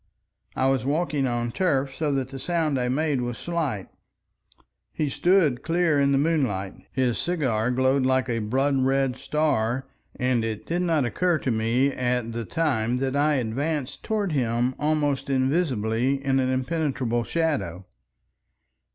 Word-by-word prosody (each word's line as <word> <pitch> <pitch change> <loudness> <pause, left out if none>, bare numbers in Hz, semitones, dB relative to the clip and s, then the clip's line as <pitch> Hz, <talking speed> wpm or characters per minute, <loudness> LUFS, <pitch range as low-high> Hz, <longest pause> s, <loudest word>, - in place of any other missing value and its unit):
I 130 - +1
was 135 -3 +1
walking 145 -1 0
on 120 -1 -1
turf, 140 -5 0
so 150 -1 -1
that 135 -2 -1
the 135 0 -7
sound 160 -4 0
I 125 - 0
made 145 0 0
was 120 -1 -3
slight. 155 - -2 1.0
He 150 -2 -1
stood 165 -6 +2
clear 165 -2 +2
in 140 0 +3
the 135 - +3
moonlight, 135 - 0 0.2
his 125 -3 0
cigar 130 -10 0
glowed 130 +2 +2
like 130 0 +2
a 115 -2 -1
blood 135 +6 +1
red 135 -1 +1
star, 130 -4 0 0.3
and 125 -2 +1
it 110 -2 -4
did 175 +2 -1
not 165 -6 +2
occur 170 +9 +1
to 130 - -2
me 115 +5 +1
at 125 -2 -1
the 115 0 -4
time 125 -5 0
that 135 +1 -1
I 150 +1 +3
advanced 135 +4 -2
towards 205 -6 -1
him 120 -1 +1
almost 145 -2 0
invisibly 130 -2 0
in 135 0 +2
an 130 -1 +1
impenetrable 130 -3 -1
shadow. 130 - -1
135 Hz, 150 wpm, -25 LUFS, 120-150 Hz, 1.0 s, in